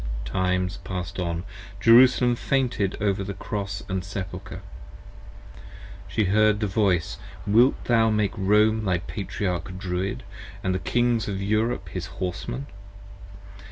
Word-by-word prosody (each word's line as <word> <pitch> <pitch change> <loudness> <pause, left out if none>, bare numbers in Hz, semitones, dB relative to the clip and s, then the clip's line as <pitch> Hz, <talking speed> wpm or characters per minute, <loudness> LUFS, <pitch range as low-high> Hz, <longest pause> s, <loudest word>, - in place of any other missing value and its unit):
Times 90 0 0
passed 90 -1 -5
on: 85 -1 -2 0.4
Jerusalem 120 +2 +6
fainted 120 -7 0
over 100 -1 0
the 100 0 -5
Cross 100 -2 -4
& 95 - -1
Sepulcher. 95 -2 -6 1.4
She 110 - 0
heard 105 +2 +3
the 105 - 0
voice: 95 -5 +1 0.3
50 - - -2
Wilt 120 +5 +4
thou 115 -2 +4
make 105 -2 +1
Rome 105 +3 +3
thy 90 -2 +2
Patriarch 95 0 -4
Druid, 95 +1 -3 0.2
& - - -15
the 95 0 0
Kings 120 +4 +1
of 100 -2 -3
Europe 110 +4 0
his - - -5
Horsemen? 120 +9 -4
100 Hz, 125 wpm, -25 LUFS, 95-110 Hz, 1.4 s, Jerusalem